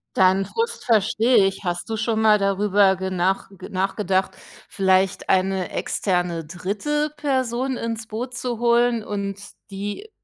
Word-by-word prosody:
Deinen 190 +1 +4
Frust 460 - -3
verstehe 220 0 +3
ich. 195 +1 -2
Hast 175 -1 -3
du 225 - -1
schon 220 0 0
mal 215 -1 +5
darüber 195 0 +3
genach 190 0 -1 0.2
nachgedacht, 190 0 0 0.4
vielleicht 190 0 +1
eine 190 -1 +1
externe 175 -4 -1
dritte 210 - -2
Person 260 -3 -1
ins 225 -1 -4
Boot 240 +3 -5
zu 245 -1 -3
holen 235 -1 +3
und 200 -2 -4 0.3
die 205 - -6
205 Hz, 130 wpm, -22 LUFS, 190-235 Hz, 0.4 s, mal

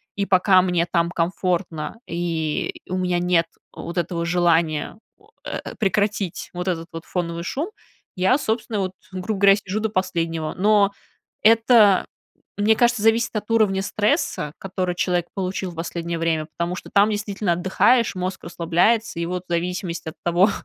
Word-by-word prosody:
и 200 - -1
пока 185 0 +5
мне 180 -2 +1
там 170 0 +2
комфортно, 175 +1 -2
и 165 -3 -2 0.2
у 185 - -1
меня 180 -1 0
нет 175 -1 +2 0.3
вот 170 +1 -7
этого 170 0 -1
желания 170 -1 +1 0.2
о 420 +1 -25 0.2
э, - - -5
прекратить 200 -3 -1
вот 180 +1 -4
этот 165 -2 -2
вот 165 0 -8
фоновый 170 -2 -3
шум, 295 - -3 0.5
я, 190 +8 +3
собственно 220 -4 -2
вот, 190 -1 -1 0.2
грубо 190 +2 -3
говоря, 200 0 +7
сижу 200 0 -4
до 220 - 0
последнего. 165 -5 -2
Но 205 +1 +4 0.5
это, 225 -3 +5 0.5
мне 210 +2 +4
кажется, 240 -1 +2
зависит 230 +1 +3
от 210 +1 -3
уровня 210 -4 +3
стресса, 205 - 0
который 185 -2 -3
человек 175 -1 0
получил 190 -1 -3
в - - -13
последнее 170 0 -4
время, 160 -2 0
потому 170 +1 -1
что - - -9
там 205 +2 +5
действительно 205 -3 -1
отдыхаешь, 190 +7 +2
мозг 185 +1 -4
расслабляется, 175 +5 +1
и - - -1
вот 180 0 -3
в - - -11
зависимости 175 -1 -2
от - - -12
того, 175 +4 +4
185 Hz, 160 wpm, -22 LUFS, 170-205 Hz, 0.5 s, говоря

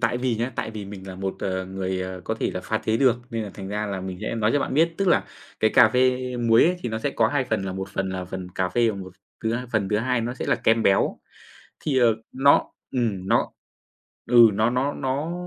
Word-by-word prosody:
tại 120 0 +1
vì 125 -2 0
nhá, 120 +4 -2
tại 110 - -2
vì 105 -2 -7
mình 95 -1 -9
là 95 - -7
một, 95 +1 -3
ờ, 95 -1 -2
người, 95 0 -3
ờ, 95 0 -5
có 110 - -1
thể - - -2
là 90 - -3
pha 110 +4 -2
chế 110 0 0
được, 125 -2 +4
nên 115 -2 -2
là 105 - -6
thành 95 -1 -7
ra 105 +1 -2
là 100 -2 -4
mình 95 -1 -6
sẽ 110 - -3
nói 110 -1 +1
cho - - +3
bạn 135 - -2
biết. 165 +2 +3
Tức 195 - +1
là - - +3 0.4
cái 110 - +4
cà 110 - +7
phê 125 +2 +2 0.2
muối 115 -1 +4
ấy 180 +2 +2
thì 120 - -4
nó 110 0 -3
sẽ 140 +5 -1
có 110 -3 +2
2 145 -1 0
phần 110 -5 -1
là 95 - -3
1 95 +1 -5
phần 95 0 -3
là 95 -1 -4
phần 95 0 -6
cà 95 -1 0
phê 115 +5 +2
và 100 - -6
một 95 -1 -8 0.3
thứ 110 +1 0
h - - -2
phần 100 -4 +1
thứ 105 - +1
hai 125 0 0
nó 120 +2 -3
sẽ - - -5
là - - +3
kem 115 0 +2
béo. 95 - +2 0.6
Thì, 135 -4 0
ờ, 115 -3 +4 0.2
nó 140 +2 +4 0.3
ừm, 105 -7 -1
nó - - +2 0.8
ừ, 120 -2 +7
nó 110 +3 +2
nó 130 +4 0
nó 140 +5 -2
110 Hz, 270 wpm, -24 LUFS, 95-125 Hz, 0.8 s, cà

